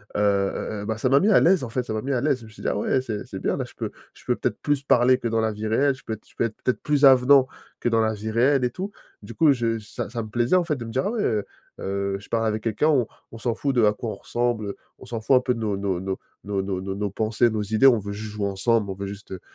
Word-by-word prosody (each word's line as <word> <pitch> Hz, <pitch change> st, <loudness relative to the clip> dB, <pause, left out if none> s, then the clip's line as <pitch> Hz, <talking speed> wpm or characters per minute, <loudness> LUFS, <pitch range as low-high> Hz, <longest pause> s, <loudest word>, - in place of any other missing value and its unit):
heu, 105 Hz, -, +1 dB
heu, 100 Hz, 0 st, 0 dB
heu, -, -, -6 dB
ben, 110 Hz, +1 st, -2 dB
ça 130 Hz, -, 0 dB
m'a 135 Hz, +2 st, +5 dB
mis 205 Hz, -, +3 dB
à 210 Hz, -, +6 dB
l'aise 180 Hz, -3 st, +4 dB
en -, -, -7 dB
fait, 125 Hz, +2 st, -1 dB
ça 110 Hz, -, -5 dB
m'a 110 Hz, -, -2 dB
mis 140 Hz, +3 st, -2 dB
à 125 Hz, -, 0 dB
l'aise. 140 Hz, -3 st, +1 dB
Je 115 Hz, -, -12 dB
me 110 Hz, -, -13 dB
suis 110 Hz, -, -14 dB
dit: -, -, -3 dB
«Ah -, -, -1 dB
ouais, 115 Hz, +5 st, +1 dB
c'est 110 Hz, -5 st, -5 dB
c'est -, -, -7 dB
bien -, -, -1 dB
là, -, -, -2 dB
je -, -, -15 dB
peux -, -, -4 dB, 0.2 s
je -, -, -18 dB
peux -, -, +1 dB
peut-être -, -, -1 dB
plus 145 Hz, -2 st, 0 dB
parler 125 Hz, -1 st, +4 dB
que 120 Hz, -, -3 dB
dans 115 Hz, 0 st, +1 dB
la 110 Hz, 0 st, +1 dB
vie 105 Hz, +1 st, -4 dB
réelle, 135 Hz, +5 st, +2 dB
je -, -, -18 dB
peux 110 Hz, -, -3 dB
être 110 Hz, -, -9 dB
je -, -, -22 dB
peux -, -, +1 dB
être 110 Hz, -2 st, -4 dB
peut-être 125 Hz, -, 0 dB
plus 150 Hz, -1 st, +1 dB
avenant 130 Hz, 0 st, +7 dB, 0.3 s
que -, -, +1 dB
dans 115 Hz, -1 st, +2 dB
la 110 Hz, 0 st, +1 dB
vie 110 Hz, +1 st, -5 dB
réelle, 130 Hz, +4 st, +3 dB
et 125 Hz, -, +2 dB
tout», 190 Hz, +10 st, -5 dB, 0.3 s
du -, -, -9 dB
coup 160 Hz, -3 st, +5 dB
je 115 Hz, -3 st, 0 dB
ça 105 Hz, -, -6 dB
ça 115 Hz, 0 st, -4 dB
me 110 Hz, -, -9 dB
plaisait, 120 Hz, +8 st, +1 dB
en 180 Hz, -, +4 dB
fait, 155 Hz, -4 st, -1 dB
de 120 Hz, -, -6 dB
me 115 Hz, -, -7 dB
dire: 130 Hz, +3 st, 0 dB
«Ah -, -, -1 dB
ouais, 225 Hz, -3 st, -1 dB
heu, 105 Hz, -3 st, 0 dB, 0.3 s
heu, 100 Hz, 0 st, -2 dB
je 105 Hz, -, -16 dB
parle 115 Hz, -1 st, +1 dB
avec 110 Hz, 0 st, -2 dB
quelqu'un, 115 Hz, +7 st, +1 dB
on 130 Hz, -7 st, +3 dB, 0.2 s
on 115 Hz, -, -9 dB
s'en 115 Hz, +1 st, -1 dB
fout 140 Hz, +1 st, -1 dB
d'à 110 Hz, -4 st, +5 dB
quoi 115 Hz, +2 st, -5 dB
on -, -, -5 dB
ressemble. 120 Hz, +1 st, -1 dB
Heu, -, -, -5 dB, 0.2 s
on -, -, -12 dB
s'en 115 Hz, 0 st, -5 dB
fout 120 Hz, +4 st, +3 dB
un -, -, +7 dB
peu 125 Hz, -1 st, 0 dB
de 115 Hz, -, -6 dB
nos 105 Hz, -3 st, -1 dB
nos 95 Hz, -3 st, -1 dB
nos 95 Hz, 0 st, -3 dB, 0.3 s
nos 100 Hz, -1 st, -1 dB
nos 95 Hz, -1 st, -3 dB
nos 95 Hz, 0 st, -4 dB
nos 100 Hz, 0 st, -2 dB
pensées, 110 Hz, +4 st, +1 dB
nos 110 Hz, -1 st, -2 dB
idées. 110 Hz, +6 st, +4 dB
On 120 Hz, -, +6 dB
veut 100 Hz, 0 st, -6 dB
juste 105 Hz, +1 st, -6 dB
jouer 105 Hz, -1 st, -1 dB
ensemble. 100 Hz, +2 st, +1 dB
On -, -, -3 dB
veut 100 Hz, +1 st, -5 dB
juste, 100 Hz, 0 st, -9 dB
heu, 95 Hz, -, -5 dB
115 Hz, 330 wpm, -24 LUFS, 105-130 Hz, 0.3 s, avenant